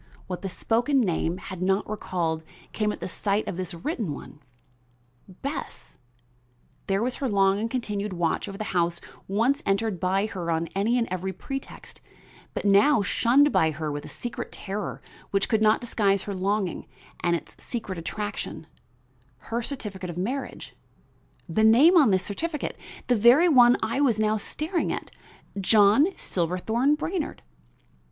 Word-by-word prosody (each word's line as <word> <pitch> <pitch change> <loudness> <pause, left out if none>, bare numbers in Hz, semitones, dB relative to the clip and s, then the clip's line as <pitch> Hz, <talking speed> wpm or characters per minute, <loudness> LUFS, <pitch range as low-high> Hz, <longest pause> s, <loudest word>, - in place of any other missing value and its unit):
What 180 -1 -5
the 195 - -3
spoken 240 +9 +1
name 175 -5 0
had 185 -1 -8
not 190 +2 +1
recalled 170 -6 -2 0.3
came 210 -1 0
at - - -8
the - - -3
sight 200 +3 -1
of - - -3
this 180 -1 -5
written 185 - -3
one. 150 - -11 0.9
Bess! 270 - -7 0.9
there 195 +2 +1
was 250 +1 -1
her 270 - -1
long 195 -1 +3
and 225 +2 -2
continued 210 -5 -2
watch 170 -2 -1
over 195 - -7
the 215 - -3
house 170 -1 +1 0.3
once 235 +9 +1
entered 200 -1 0
by 190 +3 +1
her 185 -5 -5
on 165 0 0
any 215 +5 +1
and 235 -1 +1
every 185 +1 -2
pretext, 270 +8 -8 0.5
but - - -3
now 205 +5 +5
shunned 270 +9 +4
by 160 - +3
her 155 0 -3
with 145 0 -4
a - - -9
secret 240 - -6
terror 200 +1 -5 0.3
which 195 0 +1
could 220 -1 +1
not 215 0 +4
disguise 200 -5 +1
her 205 - -4
longing 195 0 -1 0.3
and 170 0 +1
its 170 - -7
secret 210 -7 -4
attraction; 205 +6 -5 0.9
her 235 +1 0
certificate 205 -8 -5
of 170 - -6
marriage; 250 +10 -4 0.7
the 205 +6 +1
name 255 +11 +7
on 295 -9 +6
this 190 -2 +2
certificate 300 +9 -3 0.3
the 245 - +3
very 240 +10 +6
one 245 -6 +6
I 230 +5 0
was 245 -7 +3
now 215 0 +2
staring 320 - -2
at - - -5 0.5
John 210 - +5
Silverthorn 220 - 0
Brainard! 325 +1 -4
205 Hz, 160 wpm, -26 LUFS, 185-240 Hz, 0.9 s, name